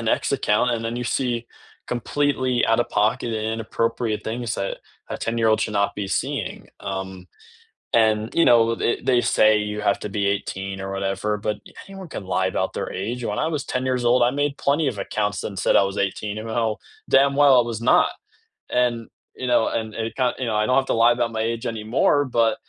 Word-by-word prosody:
an - - -5
X - - -13
account, 105 +4 +2
and 115 -1 -2
then 115 +1 -3
you - - -3 0.2
see 125 -2 0 0.6
completely 130 0 0
out-of-pocket 115 -1 +1
and 115 - -2 0.2
inappropriate 115 0 -2
things 115 +1 -3
that 100 - -2 0.3
a - - -4
ten-year-old 115 -1 +2
should 110 - -1
not 100 0 0
be 100 - -2
seeing, - - -3 0.2
um, 95 -1 -6 0.8
and, 110 -1 +2 0.2
you 170 - +6
know, 120 -1 +7 0.2
th - - +1
they 125 -2 +5 0.2
say 110 - +6 0.2
you 105 - -5
have 100 - +2
to - - -3
be 100 - +1
18 95 -1 -5
or 95 - -5
whatever, 95 +1 -2 0.2
but 105 - 0 0.3
anyone 195 -2 -9
can 95 - -5
lie 95 +1 +2
about - - -1
their - - -4
age. 120 +4 -4
When - - -2
I 160 - 0
was 145 - -2
10 130 0 -1
years 125 -1 0
old, 125 +1 +4
I - - +2
made 145 -1 -1
plenty 145 +2 +2
of 105 - -9
accounts 105 +1 -2
and 100 - -6
said - - +2
I - - +6
was 100 - -6
18 105 +2 -4
and 110 - -6
know 110 - -4
how 110 - +1 0.4
damn 140 +1 +5
well 140 -2 +7
I 120 - +6
was 110 - -5
not. - - +4 0.7
And, 120 -1 +2 0.5
you - - -1
know, 120 - +4
and 110 -1 -2
and 115 - -2
it 115 - -15
ki 125 -1 +3
you 130 - -1
know, 110 - 0
I 110 - +1
don't 125 - +2
have 135 - -8
to - - 0
lie 120 +1 +7
about 120 -1 -1
my - - -1
age 115 0 -6
anymore 115 +5 +1 0.2
but, 115 -1 +4
115 Hz, 220 wpm, -23 LUFS, 105-125 Hz, 0.8 s, know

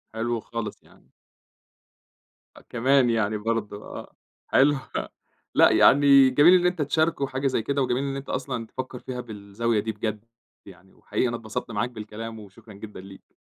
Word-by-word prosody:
حلو 115 +1 -1
خالص 115 -3 -6
يعني. - - -24 1.5
آه - - -14
كمان 130 +1 +3
يعني 110 -2 0
برضه، 105 -1 -3
آه - - -9 0.3
حلو 145 +2 +4 0.8
لأ - - +6
يعني 140 -1 +6
جميل 145 +7 +6
إن - - -1
أنتَ 180 -2 +1
تشاركه 155 0 0
حاجة 130 +1 -2
زي 125 - 0
كده، 140 +4 -1
وجميل 130 +1 0
إن 140 -1 -3
أنتَ 135 0 -7
أصلًا 125 -3 -3
تفكر 130 +1 -6
فيها 125 -1 -6
بالزاوية 105 +2 -2
دي 110 +2 -2
بجد 110 0 -5 0.4
يعني، 95 -1 -16
وحقيقي 110 +4 -2
أنا 120 - -2
اتبسطت 110 0 -6
معاك 115 +3 -1
بالكلام، 110 0 -8
وشكرا 105 +1 -14
جدًا 105 0 -10
ليك. 95 0 -15
115 Hz, 160 wpm, -25 LUFS, 105-135 Hz, 1.5 s, لأ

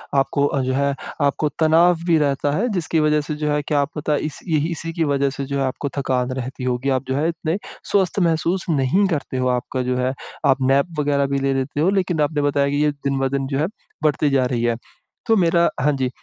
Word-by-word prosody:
आपको 135 +1 +2
अ, 140 -2 0
जो 130 0 -1
है 140 +1 +1 0.3
आपको 145 +1 +1
तनाव 165 +3 +5
भी 165 - +4
रहता 145 -1 +1
है 225 +8 +1
जिसकी 165 -2 0
वजह 150 0 +3
से 150 +1 -4
जो 150 0 -2
है 150 0 +1
क्या 145 0 0
आप 140 +2 0
पता 150 0 0
इस 150 0 -3
यही 155 0 +1
इसी 165 0 -4
की 165 - 0
वजह 140 -2 +1
से 135 0 -5
जो 140 0 -3
है - - +1
आपको 130 +2 -3
थकान 130 -2 0
रहती 130 0 -5
होगी। 125 +1 -1
आप 130 -1 +1
जो 130 - -1
है 150 +4 +1
इतने 165 +1 -2 0.3
स्वस्थ 195 0 +2
महसूस 170 +1 +1
नहीं 160 +7 +2
करते 145 -6 -3
हो 130 0 0
आपका 125 +1 -1
जो 125 - 0
है 125 +1 0 0.3
आप 135 -1 +3
नैप 135 +4 +3
वग़ैरह 145 -1 +2
भी 140 0 -1
ले 135 0 +1
लेते 135 +2 -2
हो 170 - +3
लेकिन 180 -5 0
आपने 145 0 +1
बताया 140 -1 +1
कि 145 +1 +1
ये 150 - +3
दिन 140 -1 -3
ब 135 - +1
दिन 135 -1 -1
जो 135 0 -2
है 155 - +1 0.4
बढ़ती 150 -1 +2
जा 135 -2 +2
रही 120 -2 -1
है। 120 -1 +1 0.5
तो 225 - +4
मेरा 170 -1 +3
हाँ 150 +3 +3
जी, 130 -2 -1
145 Hz, 245 wpm, -21 LUFS, 135-155 Hz, 0.5 s, तनाव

